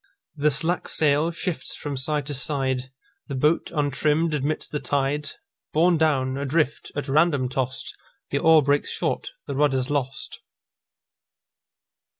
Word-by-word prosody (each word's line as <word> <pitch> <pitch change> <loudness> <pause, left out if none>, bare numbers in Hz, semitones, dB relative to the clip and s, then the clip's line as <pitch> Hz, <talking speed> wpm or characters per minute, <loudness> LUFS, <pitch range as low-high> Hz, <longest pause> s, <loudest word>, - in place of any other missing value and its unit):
The 150 +1 +2
slack 160 +5 -1
sail 150 +1 +3
shifts 170 -4 -3
from 145 -1 -5
side 145 +2 0
to 145 - -3
side, 130 -2 0 0.4
The 140 - -4
boat, 150 +5 +2
untrimm'd, 150 +2 +1
admits 150 +1 -1
the 150 - -3
tide, 145 +2 -1 0.4
Borne 170 +1 +4
down, 135 -4 +1
adrift, 145 +1 -1
at 145 0 -3
random 145 -2 +2
tost, 130 -1 -3 0.4
The 140 - +1
oar 160 -1 +6
breaks 145 +1 +1
short, - - -2 0.2
the 140 - -4
rudder's 135 -1 +1
lost. 135 -2 -3
145 Hz, 135 wpm, -24 LUFS, 135-155 Hz, 0.4 s, oar